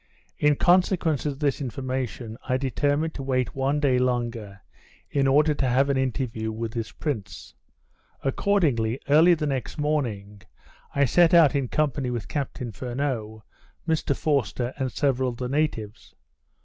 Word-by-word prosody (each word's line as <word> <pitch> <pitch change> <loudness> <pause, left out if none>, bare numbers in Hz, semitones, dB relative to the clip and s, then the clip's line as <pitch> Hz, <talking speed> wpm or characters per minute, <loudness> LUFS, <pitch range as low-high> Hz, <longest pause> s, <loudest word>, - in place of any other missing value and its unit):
In 150 0 +4
consequence 175 -4 +2
of 140 -2 -3
this 145 -1 0
information, 130 -3 -4
I 130 - +2
determined 145 +4 0
to - - -6
wait 130 -2 -1
one 135 +2 0
day 135 -4 +2
longer, 120 -5 -2 0.5
in 140 -1 +2
order 150 +3 +4
to 140 -2 -1
have 135 +3 +3
an 135 - 0
interview 125 -4 -2
with 110 0 -5
this 115 -2 -4
prince. 130 -11 -5 0.7
Accordingly, 135 - +1
early 165 +4 +6
the 155 -2 -3
next 135 -1 -3
morning, 115 -10 -2 0.5
I 140 0 +4
set 170 +6 +4
out 160 -5 +6
in 140 -3 0
company 140 -2 0
with 120 -4 -4
Captain 130 -4 -4
Furneaux, 115 -1 -4 0.4
Mr 155 -4 0
Forster, 130 -4 -1
and 130 -3 -2
several 130 -2 +1
of 120 - -7
the 125 - -3
natives. 125 -7 -3
135 Hz, 150 wpm, -25 LUFS, 120-145 Hz, 0.7 s, early